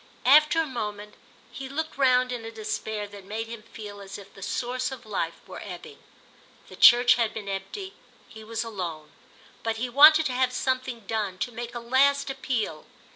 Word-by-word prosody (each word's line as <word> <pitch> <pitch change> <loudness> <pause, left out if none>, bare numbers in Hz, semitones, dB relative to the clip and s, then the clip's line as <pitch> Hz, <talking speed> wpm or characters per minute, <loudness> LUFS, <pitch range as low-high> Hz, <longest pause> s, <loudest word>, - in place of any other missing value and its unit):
After 305 +4 +6
a 325 - +2
moment 210 -6 -5 0.4
he 270 -1 -7
looked 315 +3 -4
round 255 -2 +3
in 245 -2 -4
a 225 - -6
despair 215 -1 -4
that 200 -1 -11
made 215 +4 -4
him 230 -1 -8
feel 210 -2 -10
as 200 0 -8
if 200 -1 -14
the 195 - -14
source 250 +6 -2
of 260 -4 -9
life 170 -6 -3
were - - -9
ebbing. 450 -2 -9 0.7
The - - -11
church 245 0 +7
had 225 - 0
been 210 -2 -6
empty—he 220 - -8
was 225 +1 -3
alone; 175 -9 -6 0.5
but 225 0 -2
he 245 +2 -2
wanted 305 +5 +8
to 260 - -1
have 255 0 +1
something 255 -2 -2
done, 205 -3 -3
to 245 - -3
make 240 +1 -7
a - - -3
last 270 +4 +2
appeal. 230 - -3
230 Hz, 180 wpm, -26 LUFS, 210-260 Hz, 0.7 s, wanted